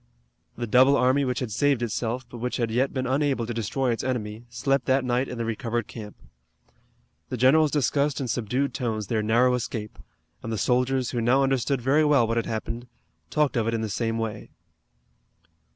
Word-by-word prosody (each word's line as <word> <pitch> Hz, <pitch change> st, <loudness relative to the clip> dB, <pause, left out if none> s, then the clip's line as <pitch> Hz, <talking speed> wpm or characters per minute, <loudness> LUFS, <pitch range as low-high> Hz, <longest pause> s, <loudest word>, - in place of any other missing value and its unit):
The 120 Hz, -, -2 dB
double 130 Hz, +5 st, +5 dB
army 130 Hz, +3 st, +3 dB
which 125 Hz, 0 st, -2 dB
had 125 Hz, -4 st, -3 dB
saved 135 Hz, +2 st, +1 dB
itself, 120 Hz, +2 st, -2 dB
but 120 Hz, 0 st, -10 dB
which 125 Hz, +2 st, -2 dB
had 115 Hz, -2 st, -1 dB
yet 130 Hz, +4 st, +1 dB
been 130 Hz, -1 st, -2 dB
unable 135 Hz, -2 st, 0 dB
to 120 Hz, -, -4 dB
destroy 120 Hz, +4 st, -1 dB
its 115 Hz, -, -2 dB
enemy, 115 Hz, -3 st, -3 dB
slept 135 Hz, +2 st, 0 dB
that 130 Hz, 0 st, +2 dB
night 125 Hz, +2 st, 0 dB
in 125 Hz, -, -6 dB
the 115 Hz, -, -2 dB
recovered 115 Hz, +1 st, -2 dB
camp. 105 Hz, -3 st, -9 dB, 1.1 s
The 125 Hz, -, -3 dB
generals 150 Hz, +6 st, +5 dB
discussed 145 Hz, 0 st, +1 dB
in 135 Hz, -, -2 dB
subdued 125 Hz, +4 st, -1 dB
tones 110 Hz, -5 st, -2 dB
their 110 Hz, +1 st, -1 dB
narrow 120 Hz, +4 st, +3 dB
escape, 110 Hz, -3 st, -4 dB, 0.4 s
and 115 Hz, -, -5 dB
the 110 Hz, -, -1 dB
soldiers, 125 Hz, +2 st, +1 dB
who 120 Hz, -, -1 dB
now 130 Hz, +4 st, +3 dB
understood 135 Hz, 0 st, 0 dB
very 140 Hz, +5 st, +3 dB
well 145 Hz, -5 st, +4 dB
what 115 Hz, +1 st, -1 dB
had 115 Hz, -, -1 dB
happened, 115 Hz, +2 st, -4 dB, 0.4 s
talked 150 Hz, -2 st, +1 dB
of 115 Hz, -2 st, +1 dB
it 115 Hz, -, 0 dB
in 115 Hz, -, -2 dB
the 110 Hz, -, -2 dB
same 115 Hz, +3 st, -1 dB
way. 110 Hz, -2 st, -4 dB
125 Hz, 195 wpm, -25 LUFS, 115-135 Hz, 1.1 s, double